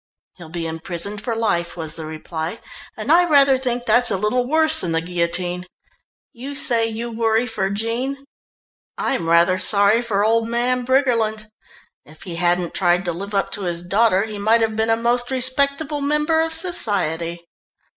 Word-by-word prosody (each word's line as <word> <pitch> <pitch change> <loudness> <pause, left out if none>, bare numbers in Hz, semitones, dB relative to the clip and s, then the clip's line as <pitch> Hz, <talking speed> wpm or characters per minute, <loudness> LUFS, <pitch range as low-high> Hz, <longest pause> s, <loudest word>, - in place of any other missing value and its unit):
"He'll 170 -3 -12
be 170 0 -5
imprisoned 170 +5 -4
for 230 +1 -3
life," 180 -7 -1
was 160 -2 -5
the 160 -2 -8
reply 160 +4 -6 0.4
"and - - -2
I 350 +1 +5
rather 275 -2 +5
think 245 -2 -3
that's 245 0 +4
a 195 - 0
little 245 +5 0
worse 315 +2 +4
than 170 -2 -2
the 165 - 0
guillotine. 175 +1 -2 0.7
You 270 +4 -8
say 235 -5 +2
you 230 +1 -5
worry 225 +1 +1
for 205 -5 -2
Jean 240 +7 -3 0.7
I'm 240 -12 -2
rather 170 +2 +3
sorry 205 +3 +5
for 210 -4 0
old 225 +1 +1
man 245 +2 -1
Briggerland. 230 -5 +1 0.6
If 155 +1 -17
he 170 -3 -7
hadn't 175 0 0
tried 180 0 +1
to 175 - -1
live 200 +4 -6
up 195 - 0
to 205 - -3
his 175 -2 -4
daughter 195 +1 +2
he 215 -2 -6
might 225 +3 +3
have 220 -1 0
been 220 +1 0
a 225 - +3
most 240 +1 +1
respectable 280 +3 0
member 300 +3 +1
of 325 0 -1
society." 175 - -2
220 Hz, 175 wpm, -20 LUFS, 175-250 Hz, 0.7 s, I